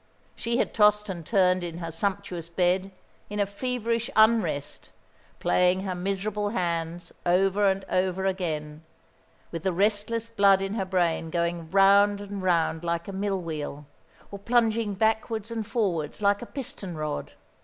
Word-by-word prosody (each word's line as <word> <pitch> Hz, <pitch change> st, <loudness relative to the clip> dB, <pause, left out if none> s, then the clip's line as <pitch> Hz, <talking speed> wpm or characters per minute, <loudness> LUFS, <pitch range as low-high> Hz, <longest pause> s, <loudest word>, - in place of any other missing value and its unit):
She 235 Hz, +1 st, -1 dB
had -, -, 0 dB
tossed 210 Hz, -1 st, +4 dB
and 175 Hz, -3 st, -5 dB
turned 185 Hz, -1 st, +2 dB
in 170 Hz, -1 st, -5 dB
her 165 Hz, -1 st, -5 dB
sumptuous 185 Hz, -1 st, -3 dB
bed 180 Hz, +2 st, +1 dB, 0.4 s
in 210 Hz, 0 st, -4 dB
a 205 Hz, -, +3 dB
feverish 230 Hz, +2 st, -2 dB
unrest, 215 Hz, -10 st, +2 dB, 0.5 s
playing 180 Hz, +1 st, +3 dB
her 190 Hz, -1 st, -3 dB
miserable 200 Hz, +3 st, -2 dB
hands 170 Hz, -4 st, -2 dB
over 195 Hz, +3 st, +3 dB
and 195 Hz, 0 st, -2 dB
over 185 Hz, +1 st, 0 dB
again, 155 Hz, -5 st, -2 dB, 0.7 s
with 165 Hz, -, -4 dB
the 190 Hz, -, 0 dB
restless 210 Hz, +4 st, 0 dB
blood 200 Hz, -4 st, +4 dB
in 195 Hz, +1 st, -3 dB
her 200 Hz, -3 st, -1 dB
brain 175 Hz, -3 st, 0 dB
going 170 Hz, -1 st, -2 dB
round 200 Hz, +2 st, +5 dB
and 200 Hz, -1 st, -6 dB
round 170 Hz, -3 st, +1 dB
like 170 Hz, 0 st, -2 dB
a 200 Hz, -, -6 dB
mill 195 Hz, 0 st, -1 dB
wheel, 150 Hz, -3 st, -5 dB, 0.5 s
or 200 Hz, -, -7 dB
plunging 225 Hz, -1 st, +1 dB
backwards 220 Hz, +1 st, 0 dB
and 225 Hz, -2 st, -3 dB
forwards 185 Hz, -, -1 dB
like 200 Hz, -1 st, +2 dB
a 240 Hz, -, -7 dB
piston 250 Hz, -, -6 dB
rod. 155 Hz, -1 st, -4 dB
195 Hz, 155 wpm, -26 LUFS, 175-210 Hz, 0.7 s, round